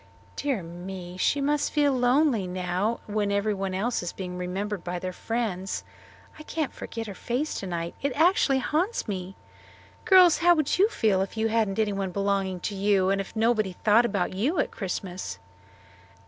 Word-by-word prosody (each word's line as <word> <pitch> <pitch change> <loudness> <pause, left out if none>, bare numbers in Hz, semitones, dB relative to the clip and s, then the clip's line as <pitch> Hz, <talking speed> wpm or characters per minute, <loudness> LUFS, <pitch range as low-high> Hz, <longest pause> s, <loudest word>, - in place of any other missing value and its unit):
"Dear 270 -10 -1
me! 175 +1 -8
She 285 +9 +2
must 290 +1 +1
feel 290 -2 +3
lonely 250 -4 +2
now 185 +5 -1
when 210 -1 -1
everybody 200 -2 -1
else 235 +5 0
is 175 - -4
being 180 -2 -6
remembered 185 +2 -3
by 180 0 -3
their 185 +1 -4
friends. 205 -4 -3 0.6
I - - -8
can't 305 -2 -3
forget 225 0 -6
her 205 - -6
face 250 +10 -2
tonight; 170 -3 -4
it 280 - 0
actually 315 -4 +4
haunts 320 - -1
me. 190 -2 -4 0.7
Girls, 370 -5 +7
how 345 0 +5
would 310 +2 0
you 410 +3 +5
feel 215 - +2
if 195 +3 -4
you 220 0 +1
hadn't 220 -3 +1
anyone 200 -3 0
belonging 195 -1 -1
to 210 - -3
you, 195 -1 +2
and 195 0 +1
if 195 - -10
nobody 220 -3 +2
thought 215 +5 +4
about 195 -5 -1
you 255 - 0
at 285 - +1
Christmas?" 180 - -5
205 Hz, 170 wpm, -26 LUFS, 185-250 Hz, 0.7 s, Girls